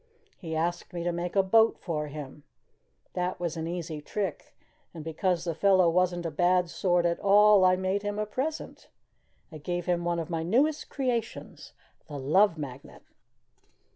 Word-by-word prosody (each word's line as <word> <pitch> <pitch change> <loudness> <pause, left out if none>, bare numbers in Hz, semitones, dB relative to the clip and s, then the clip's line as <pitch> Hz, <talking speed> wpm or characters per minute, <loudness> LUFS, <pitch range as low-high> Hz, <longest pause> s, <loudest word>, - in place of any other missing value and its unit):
He 160 -3 -5
asked 170 +3 -2
me 170 -1 -4
to 175 - 0
make 175 +2 -4
a 195 - +4
boat 225 +4 +4
for 150 -4 -3
him. 145 -1 -9 0.7
That 180 0 -2
was 170 -2 -3
an 160 0 -4
easy 170 -3 -5
trick. 190 +2 -5 0.4
And 160 - -7
because 165 +2 -1
the 170 -2 -2
fellow 185 0 +4
wasn't 175 0 +1
a 165 - -2
bad 175 +2 +2
sort 175 -2 +1
at 170 0 0
all, 205 0 +6
I 185 0 +5
made 190 +2 -1
him 205 0 -3
a 215 - -1
present 265 +9 -5 0.6
I 155 - -9
gave 175 +3 -3
him 175 -1 0
one 170 0 0
of 165 - -3
my 165 -1 -1
newest 270 - +1
creations 245 -5 -4 0.3
the 145 -2 -7
Love 165 +7 +3
Magnet." 140 -3 -9
175 Hz, 170 wpm, -28 LUFS, 165-195 Hz, 0.7 s, all